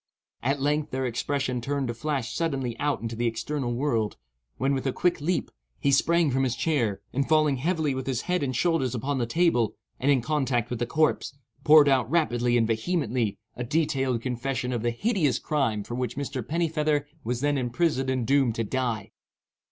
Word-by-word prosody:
At 135 +3 0
length 150 +2 0
their 130 0 -2
expression 130 +1 -1
appeared 140 +3 -2
to 120 - -2
flash 130 -1 -2
suddenly 135 -8 -1
out 145 -4 0
into 115 0 -3
the 120 +1 0
external 120 +3 -2
world, 120 -4 0 0.4
when, 135 +3 +1
with 135 0 -1
a - - +2
quick 175 +3 0
leap, 175 +4 -1 0.3
he 140 - +2
sprang 165 +2 +3
from 135 +1 +1
his 130 -3 0
chair, 120 -10 0
and 140 +1 0
falling 155 -3 +3
heavily 155 0 0
with 130 0 -4
his 130 -4 0
head 180 0 -1
and 130 -3 -1
shoulders 145 -6 +1
upon 135 +3 -1
the 120 - 0
table, 120 -6 +2 0.2
and 135 - +1
in 135 -4 +3
contact 125 -4 0
with 120 - -2
the 120 - -1
corpse, 155 -1 +1 0.3
poured 150 0 +7
out 130 -4 +3
rapidly 120 -7 +2
and 115 - +3
vehemently 115 - 0 0.2
a 120 - -4
detailed 135 -3 0
confession 125 0 -2
of 120 - -1
the 120 - +1
hideous 155 - +1
crime 125 -9 0
for 120 - -7
which 125 0 -3
Mr. 140 -2 -3
Pennifeather 155 0 0 0.2
was 120 +2 -2
then 145 0 +2
imprisoned 130 +1 0
and 130 -2 0
doomed 135 -3 +3
to 115 - -1
die. 120 -1 -2
135 Hz, 190 wpm, -26 LUFS, 120-150 Hz, 0.4 s, poured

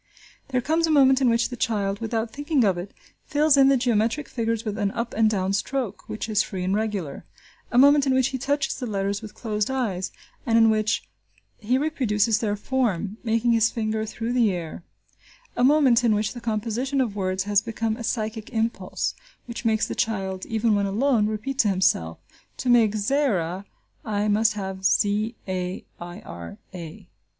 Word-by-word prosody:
There 255 -2 0
comes 320 +5 +1
a - - -2
moment 270 -3 +5
in 255 - +4
which 230 0 +2
the 245 - -5
child, 205 -5 -1
without 225 0 -2
thinking 290 -2 +1
of 195 -4 +3
it, 175 +3 -6 0.4
fills 300 0 +4
in 270 -1 +6
the 275 0 +5
geometric 240 +3 0
figures 230 -1 -2
with 215 0 -3
an 205 -1 +1
up 235 +3 -4
and 220 0 +3
down 195 -2 0
stroke, 235 0 -3
which 215 - -4
is 215 -1 +2
free 185 -2 -4
and 190 +2 0
regular; 205 -9 -3 0.5
a - - 0
moment 285 +2 +6
in 260 - +3
which 260 0 +3
he 260 - -4
touches 280 +1 0
the 250 - -5
letters 200 0 -2
with 215 -1 -10
closed 210 -2 -2
eyes, 210 -9 -2 0.3
and 230 -1 +2
in 225 -1 +6
which 215 0 0 0.5
he 235 +4 +1
reproduces 230 -8 +1
their 210 -4 -1
form, 210 -4 -1
moving 230 +1 +1
his 230 -1 +4
finger 220 -1 -2
through 225 +2 -4
the 235 -4 +3
air; 170 -1 -6 0.7
a 245 - +1
moment 265 -3 +5
in 225 -3 +3
which 210 0 -1
the 240 - -8
composition 230 +5 -1
of 235 -6 0
words 190 -1 -1
has 205 0 +2
become 225 0 -2
a 235 - -7
psychic 220 -1 -3
impulse, 225 0 -2 0.3
which 235 0 -7
makes 220 -1 +2
the - - -4
child, 190 -4 -2
even 225 0 +1
when 200 -1 +1
alone, 220 +1 +2
repeat 220 +6 -4
to 215 - +4
himself 180 - +1 0.4
"To 255 - -2
make 225 -3 +4
Zaira 200 - 0 0.4
I 210 -1 -1
must 215 +1 +3
have 190 -2 -5
z 210 +3 +2
a 185 -1 -3
i 175 0 -8
r 85 +2 -9 0.2
a." 170 -4 -9
220 Hz, 190 wpm, -24 LUFS, 205-245 Hz, 0.7 s, in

